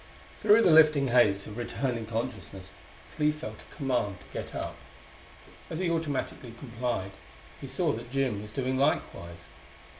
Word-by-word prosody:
Through 220 Hz, +2 st, +6 dB
the 175 Hz, -, +6 dB
lifting 155 Hz, -4 st, +6 dB
haze 105 Hz, -5 st, +4 dB
of 105 Hz, -, -8 dB
returning 120 Hz, -1 st, -2 dB
consciousness 110 Hz, -5 st, -5 dB, 0.4 s
Clee 150 Hz, -1 st, +3 dB
felt 155 Hz, +1 st, -7 dB
a -, -, -17 dB
command 120 Hz, -, -1 dB
to -, -, -14 dB
get -, -, -5 dB
up. -, -, -4 dB, 0.9 s
As 160 Hz, -, -4 dB
he 175 Hz, -1 st, 0 dB
automatically 145 Hz, -7 st, -3 dB
complied 120 Hz, -5 st, -3 dB, 0.5 s
he -, -, -7 dB
saw -, -, +1 dB
that 120 Hz, +2 st, -6 dB
Jim 130 Hz, -6 st, 0 dB
was 105 Hz, 0 st, -9 dB
doing 130 Hz, +2 st, -1 dB
likewise. 85 Hz, -, -1 dB
125 Hz, 150 wpm, -29 LUFS, 105-145 Hz, 0.9 s, Through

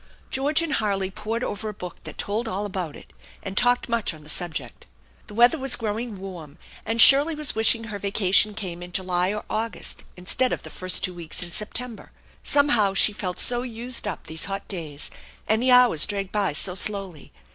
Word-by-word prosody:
George 290 Hz, +5 st, +1 dB
and 315 Hz, -2 st, -2 dB
Harley 195 Hz, -5 st, -1 dB
pored 225 Hz, +5 st, -4 dB
over 215 Hz, +1 st, -3 dB
a 210 Hz, -, -8 dB
book 180 Hz, -3 st, -9 dB
that -, -, -9 dB
told 220 Hz, +4 st, -2 dB
all 205 Hz, -1 st, -3 dB
about 185 Hz, -6 st, -5 dB
it, -, -, -15 dB, 0.3 s
and 195 Hz, -, -6 dB
talked 245 Hz, +3 st, +2 dB
much 230 Hz, -7 st, -1 dB
on 155 Hz, -, -15 dB
the 150 Hz, -, -11 dB
subject. 175 Hz, -3 st, -4 dB, 0.4 s
The 205 Hz, -, -11 dB
weather 240 Hz, +7 st, +5 dB
was 265 Hz, -2 st, +3 dB
growing 225 Hz, -1 st, -4 dB
warm, 175 Hz, -6 st, -9 dB, 0.3 s
and 225 Hz, +1 st, -1 dB
Shirley 285 Hz, +6 st, +8 dB
was 300 Hz, -1 st, -1 dB
wishing 225 Hz, +1 st, +3 dB
her 210 Hz, -2 st, -6 dB
vacation 200 Hz, +1 st, +3 dB
came 180 Hz, -5 st, -5 dB
in 175 Hz, 0 st, -10 dB
July 180 Hz, 0 st, +1 dB
or 210 Hz, 0 st, -4 dB
August 220 Hz, -4 st, -4 dB
instead 245 Hz, +8 st, 0 dB
of -, -, -5 dB
the -, -, -10 dB
first 185 Hz, 0 st, -2 dB
two 185 Hz, -, -1 dB
weeks 170 Hz, -1 st, -5 dB
in 175 Hz, -, -9 dB
September. 225 Hz, +5 st, -3 dB, 0.3 s
Somehow 240 Hz, -9 st, +3 dB
she 210 Hz, -, +4 dB
felt 185 Hz, -3 st, -4 dB
so 240 Hz, 0 st, +4 dB
used 240 Hz, -1 st, -4 dB
up 205 Hz, -, -5 dB
these 160 Hz, 0 st, -6 dB
hot 195 Hz, +1 st, -5 dB
days, 155 Hz, -6 st, -5 dB, 0.4 s
and 220 Hz, +1 st, +2 dB
the 255 Hz, -, +2 dB
hours 250 Hz, -11 st, +5 dB
dragged 200 Hz, -2 st, -4 dB
by 200 Hz, -6 st, 0 dB
so 180 Hz, +6 st, +3 dB
slowly. 190 Hz, -5 st, -2 dB
205 Hz, 200 wpm, -24 LUFS, 185-235 Hz, 0.4 s, Shirley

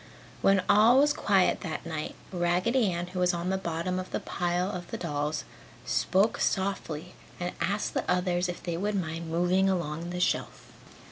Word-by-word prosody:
When 195 Hz, -1 st, +4 dB
all 215 Hz, +5 st, +6 dB
was 290 Hz, +1 st, +5 dB
quiet 195 Hz, -9 st, +2 dB
that 160 Hz, -3 st, -5 dB
night, 155 Hz, -2 st, -4 dB, 0.2 s
Raggedy 185 Hz, +6 st, +2 dB
Ann 175 Hz, 0 st, -2 dB
who 180 Hz, +1 st, -6 dB
was 180 Hz, 0 st, +2 dB
on 175 Hz, +2 st, -2 dB
the -, -, +1 dB
bottom 170 Hz, +1 st, -2 dB
of 185 Hz, -, -6 dB
the -, -, -2 dB
pile 180 Hz, +1 st, -1 dB
of 175 Hz, -3 st, -6 dB
dolls 150 Hz, -2 st, -2 dB, 0.4 s
spoke 195 Hz, +5 st, +2 dB
softly 180 Hz, -4 st, -1 dB, 0.3 s
and 175 Hz, 0 st, -3 dB
asked 205 Hz, +2 st, -1 dB
the -, -, -2 dB
others 180 Hz, 0 st, +1 dB
if 175 Hz, -, -6 dB
they 170 Hz, -2 st, -2 dB
would 205 Hz, +3 st, -1 dB
mind 165 Hz, -2 st, -3 dB
moving 180 Hz, +3 st, +2 dB
along 170 Hz, -2 st, -2 dB
the 180 Hz, 0 st, -4 dB
shelf. 180 Hz, -, -1 dB
180 Hz, 175 wpm, -28 LUFS, 170-190 Hz, 0.4 s, all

